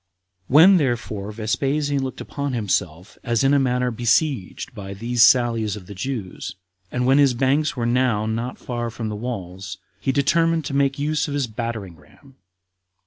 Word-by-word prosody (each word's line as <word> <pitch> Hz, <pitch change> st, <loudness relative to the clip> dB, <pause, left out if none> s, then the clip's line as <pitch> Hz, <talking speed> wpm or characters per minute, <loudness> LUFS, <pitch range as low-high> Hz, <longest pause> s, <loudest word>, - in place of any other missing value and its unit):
19. -, -, -6 dB
When, 185 Hz, +5 st, +8 dB
therefore, 110 Hz, -, -2 dB
Vespasian 135 Hz, +6 st, -1 dB
looked 130 Hz, -, -5 dB
upon 140 Hz, -1 st, -4 dB
himself 90 Hz, -6 st, -2 dB
as 115 Hz, 0 st, +1 dB
in 135 Hz, +1 st, +4 dB
a 140 Hz, -, +5 dB
manner 125 Hz, -1 st, +1 dB
besieged 120 Hz, -, 0 dB
by 100 Hz, -3 st, -7 dB
these 120 Hz, +3 st, -1 dB
sallies 115 Hz, -4 st, +4 dB
of 100 Hz, -4 st, -10 dB
the 100 Hz, -, -9 dB
Jews, 100 Hz, -2 st, -5 dB, 0.4 s
and 125 Hz, 0 st, -1 dB
when 135 Hz, +2 st, +4 dB
his 140 Hz, -3 st, +4 dB
banks 140 Hz, +4 st, +1 dB
were 120 Hz, -, -1 dB
now 120 Hz, -3 st, +1 dB
not 115 Hz, +3 st, -3 dB
far 120 Hz, -1 st, -4 dB
from 115 Hz, -1 st, -5 dB
the 105 Hz, -, -4 dB
walls, 95 Hz, -5 st, -6 dB, 0.2 s
he 135 Hz, -, 0 dB
determined 165 Hz, +3 st, +2 dB
to 135 Hz, -, -4 dB
make 140 Hz, -1 st, +1 dB
use 150 Hz, +2 st, 0 dB
of 145 Hz, -, -3 dB
his 140 Hz, -2 st, 0 dB
battering 110 Hz, -6 st, -5 dB
ram. 135 Hz, +7 st, -21 dB
120 Hz, 175 wpm, -22 LUFS, 110-140 Hz, 0.4 s, When